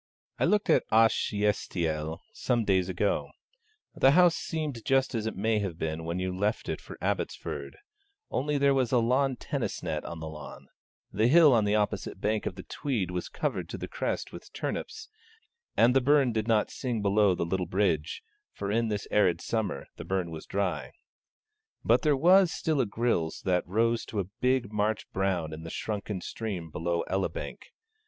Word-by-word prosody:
I - - +3
looked 210 0 +2
at - - +4
Ashiestiel 95 -8 +1
some 120 -3 0
days 95 -2 +2
ago: 95 +3 0 0.6
the 135 - +5
house 175 0 +6
seemed 150 -8 -4
just 135 -2 +2
as 110 -2 -1
it 110 - -3
may 110 +2 +1
have 95 -5 -3
been 80 0 -3
when 85 +2 -2
you 90 0 -2
left 105 +4 -1
it - - -3
for - - -10
Abbotsford, - - -3 0.5
only 145 +2 0
there 140 0 +4
was 130 -3 +1
a 125 - +4
lawn 130 +3 +2
tennis 140 +1 -4
net 80 -3 -2
on 85 - -7
the 80 - -6
lawn, 75 -2 -10 0.4
the 110 +3 +3
hill 155 0 +7
on 110 -3 +3
the 105 +1 +2
opposite 105 -1 -1
bank 110 0 0
of - - -4
the 95 - -8
Tweed 115 - -2
was 90 -1 -3
covered - - -3
to - - -5
the - - -5
crest - - -3
with - - -11
turnips, 440 0 -4 0.7
and 120 +3 +5
the 135 - +5
burn 140 -1 +4
did 110 -1 -1
not 110 -2 +2
sing 120 -5 -3
below 100 -1 +4
the 85 - -1
little 90 +1 -1
bridge, 85 -5 0 0.3
for 100 0 -4
in 115 +2 +1
this 105 -2 -3
arid 95 -5 +3
summer 110 -11 -2
the - - -6
burn 95 -3 -2
was 80 -1 -8
dry. 90 -9 -2 0.9
But 120 +2 +4
there 150 -2 +3
was 180 +4 +6
still 155 -4 0
a 120 - 0
grilse 100 -7 0
that 90 -2 0
rose 115 +4 +1
to 105 - -4
a - - +1 0.2
big 125 -4 +1
March 105 +1 0
brown 90 -5 -1
in 80 - -7
the 80 - -7
shrunken 105 0 -4
stream 90 -6 -5
below 85 +2 -1
Elibank. 95 0 -3
105 Hz, 185 wpm, -29 LUFS, 90-125 Hz, 0.9 s, hill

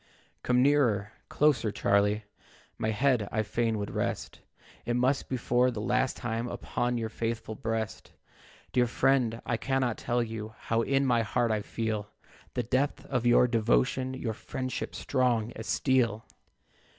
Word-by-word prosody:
"Come 125 0 +3
nearer, 120 -8 +3 0.2
closer, 145 -7 +2
Charlie, 105 +2 +2 0.6
My 110 - 0
head 115 -1 +2
I 110 0 +1
fain 115 +1 0
would 100 -1 -4
rest, - - -3 0.4
It 120 - -1
must 130 +3 +1
be 130 - -1
for 125 +1 +2
the 115 -4 -4
last 125 +4 0
time, 115 0 -2
Upon 120 0 -2
your 115 -1 -2
faithful 115 0 -3
breast. 110 0 -4 0.6
Dear 125 -1 +3
friend, 120 -2 +1
I 120 - 0
cannot 130 -1 0
tell 120 0 0
you 110 -1 -6
How 115 0 0
in 135 +3 +2
my 120 -3 +3
heart 120 +1 0
I 110 -1 0
feel 110 -1 -3 0.5
The 125 - 0
depth 130 +5 0
of 120 -2 +1
your 120 +1 +6
devotion, 125 +3 +1
Your 115 -4 -3
friendship 130 +4 -5
strong 120 -4 +1
as 110 -2 -8
steel. 115 -5 +1
120 Hz, 150 wpm, -29 LUFS, 110-130 Hz, 0.6 s, your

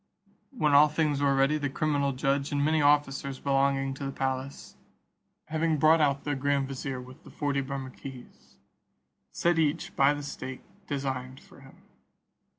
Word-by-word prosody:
When 155 - 0
all 145 +2 +8
things 150 -2 0
were 140 -1 +3
ready, 135 +3 +2
the 145 -1 -1
criminal 145 -1 0
judge, 135 +2 -1
and 145 0 +1
many 155 0 +2
officers 140 -2 +2
belonging 135 0 +1
to 135 - -8
the 135 - -3
palace, 135 0 -4 0.7
having 160 0 0
brought 155 +2 +5
out 140 -2 +1
the 145 - -1
grand 140 0 0
vizier 135 -1 -5
with 125 +1 -13
the - - -13
forty 140 -2 -1
Bermukkees, 135 -1 -9 0.8
set 175 -1 +1
each 155 +1 0
by 140 +2 +4
the 145 - -6
stake 130 -2 -7 0.2
designed 130 -2 -4
for - - -18
him. - - -17
140 Hz, 155 wpm, -28 LUFS, 135-150 Hz, 0.8 s, all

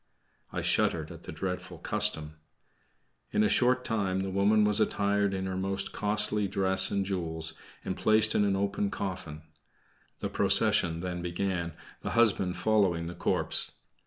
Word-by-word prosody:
I - - -3
shuddered - - +1
at - - -11
the - - -9
dreadful 90 +4 -5
custom. 75 0 +1 0.9
In 105 - +2
a - - +4
short 125 +1 +3
time 95 -5 -1
the 95 0 -3
woman 105 +3 +3
was 105 0 +3
attired 100 -1 +1
in 95 -1 -3
her 95 -1 -3
most 95 +1 -2
costly 105 0 +1
dress 95 -1 +1
and 100 -1 -1
jewels, 80 -4 -1 0.3
and 95 - -2
placed 110 +2 +4
in 105 - +2
an 100 -1 +1
open 100 +1 -1
coffin. 85 -7 -5 0.8
The - - -3
procession 85 -1 +3
then 90 -1 -4
began, 85 -1 -2 0.3
the - - -4
husband 95 -6 +2
following 95 -6 +1
the 85 - -6
corpse. - - -1
95 Hz, 155 wpm, -29 LUFS, 90-105 Hz, 0.9 s, a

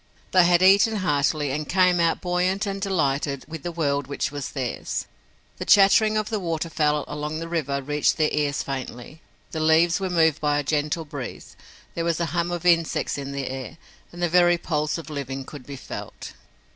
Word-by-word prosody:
They 185 -2 +6
had 175 +1 +4
eaten 200 +4 +5
heartily, 150 -5 0
and 150 +2 -3
came 180 -1 +3
out 170 -1 +1
buoyant 180 +3 0
and 195 -1 -4
delighted 145 -7 -1
with 160 -1 -7
the 175 - -4
world 145 -5 -1
which 140 -2 -2
was 145 -2 -5
theirs. 130 -4 -3 0.5
The - - -3
chattering 210 +2 +5
of 215 -1 -1
the 215 - 0
waterfowl 160 -4 -1
along 150 +1 -4
the 165 +1 -5
river 145 -5 -2
reached 150 +2 +1
their 155 -1 +2
ears 145 -1 0
faintly, 135 +2 -7 0.3
the 160 - -4
leaves 160 +3 +3
were 190 -1 -2
moved 160 -3 +2
by 150 -1 +2
a 145 - 0
gentle 150 +2 -1
breeze, 140 -5 -8 0.4
there 170 - -2
was 170 -1 0
a 170 - +1
hum 170 0 0
of 175 0 -4
insects 170 -2 +2
in 140 0 -5
the 140 -1 -4
air 130 +3 -6 0.3
and 175 0 -6
the - - +4
very 175 0 +4
pulse 155 -2 -1
of 165 -1 -8
living 135 -2 -5
could 140 -3 -11
be 140 - -6
felt. - - -8
160 Hz, 195 wpm, -24 LUFS, 145-175 Hz, 0.5 s, They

